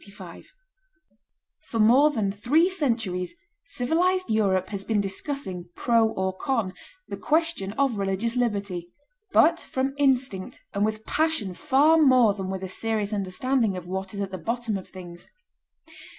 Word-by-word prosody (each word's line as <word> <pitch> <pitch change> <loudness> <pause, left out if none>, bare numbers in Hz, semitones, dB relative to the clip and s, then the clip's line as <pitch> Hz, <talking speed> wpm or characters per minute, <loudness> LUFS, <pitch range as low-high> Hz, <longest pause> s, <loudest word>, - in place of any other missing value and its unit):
] - - -46
For 230 - -3
more 250 +8 +6
than 215 -9 -1
three 285 - +2
centuries 230 - -2 0.3
civilized 340 +6 0
Europe 195 -4 +1
has 200 -2 -4
been 220 -1 0
discussing, 195 - -4
pro 230 -2 +3
or 190 -3 -2
con, 225 -4 -1 0.3
the - - -6
question 315 -11 0
of 255 -3 0
religious 195 +4 -1
liberty, 200 -7 -2 0.4
but 335 +1 +5
from 265 +1 -2
instinct 255 -9 +1
and 200 - 0
with 215 0 -2
passion 315 - 0
far 280 - +3
more 255 -7 +5
than 190 -2 -5
with 190 0 -4
a - - -3
serious 215 +2 -2
understanding 210 +2 0
of 180 - -7
what 190 +1 -4
is 200 - -3
at 195 -1 -4
the 185 - -5
bottom 230 +3 -2
of 190 - -6
things. 175 -2 -11
220 Hz, 150 wpm, -25 LUFS, 190-270 Hz, 0.4 s, more